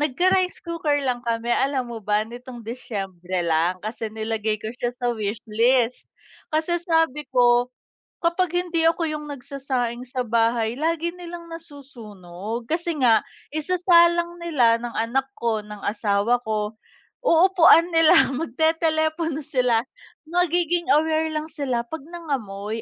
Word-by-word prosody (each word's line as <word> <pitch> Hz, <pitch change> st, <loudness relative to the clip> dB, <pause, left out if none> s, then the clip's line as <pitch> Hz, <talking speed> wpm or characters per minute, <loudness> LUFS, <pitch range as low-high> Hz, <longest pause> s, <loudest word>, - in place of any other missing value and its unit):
nagka-rice 365 Hz, +6 st, +2 dB
cooker 330 Hz, -4 st, 0 dB
lang 245 Hz, -2 st, -1 dB
kami, 230 Hz, +1 st, 0 dB
alam 265 Hz, -2 st, 0 dB
mo 225 Hz, -, -6 dB
ba 210 Hz, +1 st, +1 dB
nitong 240 Hz, 0 st, -10 dB
Disyembre 190 Hz, -7 st, -4 dB
lang, 165 Hz, +3 st, +2 dB
kasi 220 Hz, 0 st, -4 dB
nilagay 220 Hz, -1 st, -2 dB
ko 215 Hz, -, -5 dB
siya 240 Hz, -, 0 dB
sa 245 Hz, -1 st, 0 dB
wishlist. 225 Hz, +3 st, 0 dB, 0.4 s
Kasi 330 Hz, +2 st, +1 dB
sabi 325 Hz, -4 st, +1 dB
ko, 245 Hz, 0 st, +4 dB, 0.6 s
kapag 340 Hz, +1 st, +1 dB
hindi 345 Hz, -2 st, 0 dB
ako 330 Hz, +1 st, +1 dB
yung 300 Hz, -1 st, -4 dB
nagsasaing 260 Hz, -3 st, -3 dB
sa 255 Hz, -1 st, -1 dB
bahay 230 Hz, 0 st, +1 dB
lagi 330 Hz, +2 st, 0 dB
nilang 345 Hz, -1 st, -9 dB
nasusunog 230 Hz, -, -7 dB
kasi 335 Hz, 0 st, -1 dB
nga 230 Hz, -4 st, +4 dB, 0.3 s
isasalang 345 Hz, +1 st, +3 dB
nila, 250 Hz, -9 st, +3 dB
ng 240 Hz, -1 st, -4 dB
anak 260 Hz, +4 st, 0 dB
ko, 230 Hz, -2 st, 0 dB
ng 210 Hz, 0 st, -10 dB
asawa 210 Hz, +3 st, +1 dB
ko, 215 Hz, -1 st, -2 dB, 0.5 s
uupuan 335 Hz, -2 st, +6 dB
nila 325 Hz, -4 st, +6 dB
magtetelepono 315 Hz, +2 st, 0 dB
sila. 250 Hz, -4 st, +1 dB, 0.5 s
Magiging 350 Hz, 0 st, +1 dB
aware 315 Hz, +1 st, +2 dB
lang 310 Hz, +1 st, -3 dB
sila 255 Hz, -5 st, -1 dB
pag 320 Hz, +4 st, -6 dB
nangamoy, 225 Hz, -, -4 dB
260 Hz, 130 wpm, -23 LUFS, 225-330 Hz, 0.6 s, uupuan